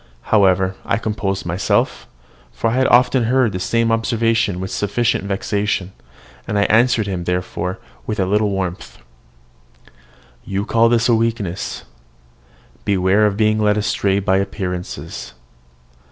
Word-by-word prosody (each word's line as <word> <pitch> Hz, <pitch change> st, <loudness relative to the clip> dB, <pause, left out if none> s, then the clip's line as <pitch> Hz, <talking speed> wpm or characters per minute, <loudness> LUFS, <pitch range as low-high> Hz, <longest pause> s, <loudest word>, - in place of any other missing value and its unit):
However, 95 Hz, -2 st, +4 dB
I -, -, 0 dB
composed 105 Hz, -3 st, -3 dB
myself, 90 Hz, +3 st, 0 dB, 0.4 s
for 115 Hz, -, -1 dB
I -, -, -2 dB
had 130 Hz, +1 st, +2 dB
often 125 Hz, 0 st, +4 dB
heard 125 Hz, -1 st, +2 dB
the 90 Hz, -, -4 dB
same 115 Hz, +4 st, +1 dB
observation 115 Hz, -4 st, +1 dB
with 95 Hz, 0 st, -5 dB
sufficient 105 Hz, +1 st, 0 dB
vexation; 100 Hz, -1 st, -1 dB, 0.6 s
and 105 Hz, -, -1 dB
I 100 Hz, -, +3 dB
answered 115 Hz, 0 st, +3 dB
him, 90 Hz, -3 st, -4 dB
therefore, 90 Hz, +1 st, -2 dB, 0.3 s
with 105 Hz, -2 st, -3 dB
a 95 Hz, -, +2 dB
little 105 Hz, +2 st, +1 dB
warmth, 95 Hz, -2 st, -4 dB, 1.5 s
"You 100 Hz, +1 st, -3 dB
call 115 Hz, +1 st, +3 dB
this 115 Hz, 0 st, +2 dB
a 120 Hz, -, +4 dB
weakness 110 Hz, -5 st, -2 dB, 1.0 s
beware 100 Hz, +2 st, +3 dB
of 100 Hz, -1 st, -2 dB
being 110 Hz, 0 st, +2 dB
led 105 Hz, 0 st, +2 dB
astray 100 Hz, -1 st, 0 dB
by 95 Hz, -1 st, +1 dB
appearances. 95 Hz, -2 st, -5 dB
105 Hz, 135 wpm, -19 LUFS, 95-115 Hz, 1.5 s, However